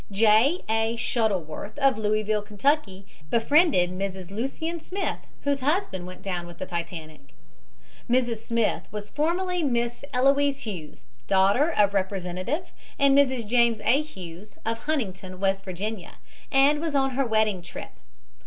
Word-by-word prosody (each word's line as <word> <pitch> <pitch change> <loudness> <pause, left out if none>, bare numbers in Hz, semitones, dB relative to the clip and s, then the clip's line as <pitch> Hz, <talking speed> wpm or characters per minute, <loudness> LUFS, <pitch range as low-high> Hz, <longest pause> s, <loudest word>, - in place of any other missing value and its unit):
J. 220 - +4
A. 225 +1 +1
Shuttleworth, 210 - -1
of 275 -2 +4
Louisville, 215 0 0
Ky., 205 -2 0 0.2
befriended 235 - +4
Mrs. 190 -1 -4
Lucien 275 +10 -3
Smith, 380 +4 -3 0.2
whose 285 -1 +1
husband 275 - -1
went 185 0 -10
down 180 -3 -3
with 175 -1 -11
the 185 - -4
Titanic. 160 -4 -7 0.7
Mrs. 240 -2 +2
Smith 230 0 -1
was 210 -1 -6
formerly 355 +4 0
Miss 240 -4 -1
Eloise 275 +2 +3
Hughes, 180 -9 -7 0.2
daughter 200 - +4
of 200 -6 +3
Representative 190 - -2 0.2
and 280 -1 +5
Mrs. 260 -4 +3
James 235 0 +3
A. 255 +7 +3
Hughes, 190 - -10
of 225 0 -1
Huntington, 195 -11 -2
W. 195 +1 +1
Va., 195 +1 -5 0.4
and 285 +2 +4
was 325 -3 -2
on 270 -1 +2
her 270 +2 +1
wedding 215 -4 +1
trip. 175 - -8
220 Hz, 135 wpm, -26 LUFS, 190-275 Hz, 0.7 s, and